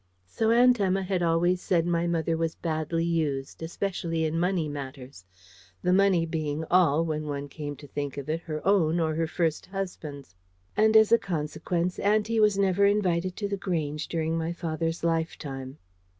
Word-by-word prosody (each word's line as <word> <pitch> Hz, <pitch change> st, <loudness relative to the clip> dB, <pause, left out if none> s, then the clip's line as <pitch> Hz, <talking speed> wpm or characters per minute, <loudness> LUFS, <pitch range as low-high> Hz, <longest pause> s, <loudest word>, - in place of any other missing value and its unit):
So 220 Hz, -, -1 dB
Aunt 245 Hz, +1 st, +5 dB
Emma 195 Hz, -1 st, +1 dB
had 185 Hz, -1 st, -1 dB
always 175 Hz, +2 st, +2 dB
said 170 Hz, -3 st, +1 dB
my 170 Hz, 0 st, +1 dB
mother 165 Hz, -1 st, 0 dB
was 165 Hz, 0 st, -1 dB
badly 165 Hz, 0 st, -2 dB
used, 150 Hz, -6 st, -2 dB
especially 165 Hz, -1 st, -2 dB
in 160 Hz, +1 st, -1 dB
money 175 Hz, -2 st, +1 dB
matters 135 Hz, -8 st, -8 dB, 0.6 s
the 180 Hz, 0 st, +3 dB
money 190 Hz, -3 st, +4 dB
being 160 Hz, -1 st, -3 dB
all, 165 Hz, -3 st, +4 dB
when 155 Hz, -1 st, -3 dB
one 145 Hz, -1 st, -4 dB
came 145 Hz, 0 st, -6 dB
to 145 Hz, -, -13 dB
think 145 Hz, -1 st, -5 dB
of 140 Hz, -, -5 dB
it, 160 Hz, +1 st, -1 dB
her 155 Hz, -3 st, -6 dB
own 175 Hz, -4 st, +3 dB
or 160 Hz, -1 st, +1 dB
her 165 Hz, +1 st, 0 dB
first 160 Hz, -1 st, -1 dB
husband's; 165 Hz, -, -6 dB, 0.4 s
and 220 Hz, +1 st, +5 dB
as 220 Hz, 0 st, +5 dB
a 230 Hz, -, +6 dB
consequence, 175 Hz, 0 st, -2 dB
auntie 215 Hz, +2 st, +2 dB
was 210 Hz, -2 st, +4 dB
never 195 Hz, 0 st, +2 dB
invited 185 Hz, -3 st, +1 dB
to 205 Hz, -, -2 dB
The 200 Hz, 0 st, -2 dB
Grange 155 Hz, -6 st, -2 dB
during 160 Hz, -1 st, -1 dB
my 165 Hz, +1 st, -2 dB
father's 165 Hz, -1 st, -3 dB
lifetime. 150 Hz, -5 st, -2 dB
165 Hz, 175 wpm, -27 LUFS, 155-185 Hz, 0.6 s, a